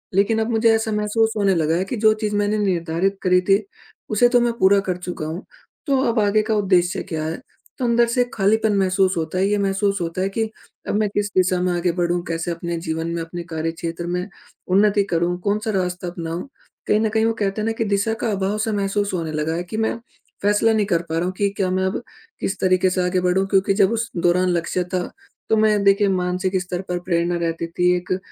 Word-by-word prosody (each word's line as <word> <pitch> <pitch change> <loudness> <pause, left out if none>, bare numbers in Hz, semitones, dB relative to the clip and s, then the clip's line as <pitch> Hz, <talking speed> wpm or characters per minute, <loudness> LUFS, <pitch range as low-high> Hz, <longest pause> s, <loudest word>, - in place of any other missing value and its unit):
लेकिन 215 +3 +3
अब 220 - -1
मुझे 225 0 +3
ऐसा 220 0 -1
महसूस 215 +1 +1
होने 200 -2 +3
लगा 160 0 +1
है 180 - +1
कि 240 - -4
जो 215 - +6
चीज़ 210 -1 -1
मैंने 205 +1 +1
निर्धारित 185 0 0
करी 180 0 +4
थी 195 +2 +4 0.5
उसे 240 +3 +4
तो 245 0 +4
मैं 235 -1 +1
पूरा 200 +1 +5
कर 180 - -1
चुका 180 -3 -5
हूँ, 165 +5 -5 0.4
तो 275 - +3
अब 230 - 0
आगे 210 +1 +3
का 220 0 0
उद्देश्य 185 -3 +2
क्या 160 -2 -2
है? 160 - -2 0.4
तो 255 - -2
अंदर 235 0 +4
से 250 - +3
खालीपन 215 +2 +2
महसूस 190 -1 +2
होता 165 +2 -2
है, 190 - +3
ये 210 - +2
महसूस 195 0 0
होता 170 +2 -3
है 195 - 0
कि 220 +2 -2 0.4
अब - - 0
मैं 210 -2 +1
किस 205 0 0
दिशा 185 -1 +3
में 180 0 +1
आगे 175 0 +1
बढ़ूँ? 175 0 +1
कैसे 165 +1 -2
अपने 170 0 -4
जीवन 160 +1 -2
में 170 - -2
अपने 170 +1 -7
कार्यक्षेत्र 165 +1 -3
में 180 +2 -2 0.4
उन्नति 205 +2 +3
करूँ? 175 +1 +1
कौन-सा 210 +3 -1
रास्ता 180 0 -3
अपनाऊँ? 170 +3 -5 0.4
कहीं 210 - +3
न 220 -1 +1
कहीं 220 +1 +1
वो 225 - +2
कहते 195 +2 -1
हैं 215 - -1
न - - -1
कि 225 - 0
दिशा 200 +2 0
का 225 - +1
अभाव 195 +1 -1
सा 220 - -1
महसूस 200 0 -1
होने 165 -3 -2
लगा 155 +1 -1
है 175 - -2
कि 215 +5 -6
मैं 225 +1 0 0.4
फ़ेेसला 205 +2 +3
नहीं 215 -2 +2
कर 170 -4 +1
पा 160 - -2
रहा 165 - 0
हूँ 185 - -2
कि 200 -1 +2
क्या 190 -2 +1
मैं 185 0 0
अब 190 +4 -2 0.4
किस 195 0 -2
तरीके 185 0 +3
से 185 0 0
आगे 180 0 +1
बढ़ूँ 180 +2 +2
क्योंकि 195 0 +2
जब 195 -1 +4
उस 230 0 -1
दौरान 175 +2 +2
लक्ष्य 175 +1 0
था 180 - +1 0.5
तो 220 - +4
मैं 215 -2 +3
देखिए 200 +1 +4
मानसिक 185 +1 -1
स्तर 180 0 -4
पर 180 0 -1
प्रेरणा 175 -1 +1
रहती 165 0 -2
थी, 180 +2 +1
एक 180 +1 -2
190 Hz, 230 wpm, -21 LUFS, 175-210 Hz, 0.5 s, जो